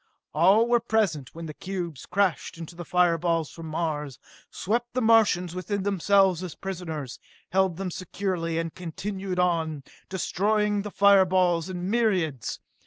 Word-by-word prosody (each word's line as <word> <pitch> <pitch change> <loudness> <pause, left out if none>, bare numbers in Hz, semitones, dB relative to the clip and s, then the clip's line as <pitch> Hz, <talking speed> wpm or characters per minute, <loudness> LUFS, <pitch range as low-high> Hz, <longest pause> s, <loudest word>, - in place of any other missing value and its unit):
All 195 +9 +5
were 240 0 +4
present 210 - -1
when 165 0 -7
the 155 - -6
cubes 175 -5 -6
crashed 185 -3 0
into 165 +1 -9
the 175 - -6
fire 175 0 +2
balls 165 -2 0
from 165 -1 -9
Mars, 155 -4 -3 0.3
swept 240 +5 -2
the - - +2
Martians 215 -6 +4
within 190 +2 -3
themselves 195 -2 +3
as 180 -4 -6
prisoners, 160 -8 -6 0.3
held 190 -2 +2
them 190 -1 -3
securely 180 -2 -3
and 165 -1 -2
continued 190 +2 -5
on, 165 -5 0 0.3
destroying 205 +2 0
the 205 - -5
fire 200 -1 +5
balls 180 -2 +1
in 180 -1 -4
myriads. 190 - 0
180 Hz, 150 wpm, -26 LUFS, 165-200 Hz, 0.3 s, All